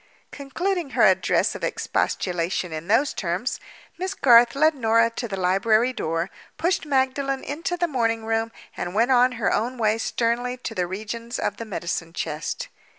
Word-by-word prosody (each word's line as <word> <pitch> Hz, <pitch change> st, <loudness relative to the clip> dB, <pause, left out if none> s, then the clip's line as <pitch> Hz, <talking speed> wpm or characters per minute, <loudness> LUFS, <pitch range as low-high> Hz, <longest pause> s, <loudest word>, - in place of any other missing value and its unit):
Concluding 340 Hz, +4 st, -2 dB
her -, -, +5 dB
address -, -, +3 dB
of -, -, -8 dB
expostulation 175 Hz, -1 st, -1 dB
in 160 Hz, +2 st, -6 dB
those 235 Hz, +7 st, +3 dB
terms, 180 Hz, +6 st, -2 dB, 0.4 s
Miss 375 Hz, +1 st, -3 dB
Garth 240 Hz, -1 st, +6 dB
led 310 Hz, +3 st, +4 dB
Norah 230 Hz, -3 st, +3 dB
to 235 Hz, +1 st, -4 dB
the 195 Hz, -3 st, -5 dB
library 215 Hz, +7 st, +2 dB
door, 165 Hz, -4 st, -2 dB, 0.3 s
pushed 345 Hz, -2 st, 0 dB
Magdalen 270 Hz, 0 st, 0 dB
into 335 Hz, +5 st, -3 dB
the 345 Hz, 0 st, +1 dB
morning 230 Hz, -6 st, 0 dB
room, 225 Hz, 0 st, 0 dB, 0.2 s
and 175 Hz, +2 st, -4 dB
went 235 Hz, +4 st, +3 dB
on 250 Hz, 0 st, +5 dB
her 230 Hz, -6 st, 0 dB
own 245 Hz, +4 st, -1 dB
way 220 Hz, -1 st, +1 dB
sternly 240 Hz, +2 st, -1 dB
to 245 Hz, -2 st, -6 dB
the 180 Hz, -4 st, -1 dB
regions 230 Hz, +5 st, -5 dB
of 205 Hz, -, -2 dB
the 230 Hz, -, -6 dB
medicine 170 Hz, -5 st, -4 dB
chest. 150 Hz, -3 st, -4 dB
230 Hz, 165 wpm, -24 LUFS, 200-265 Hz, 0.4 s, Garth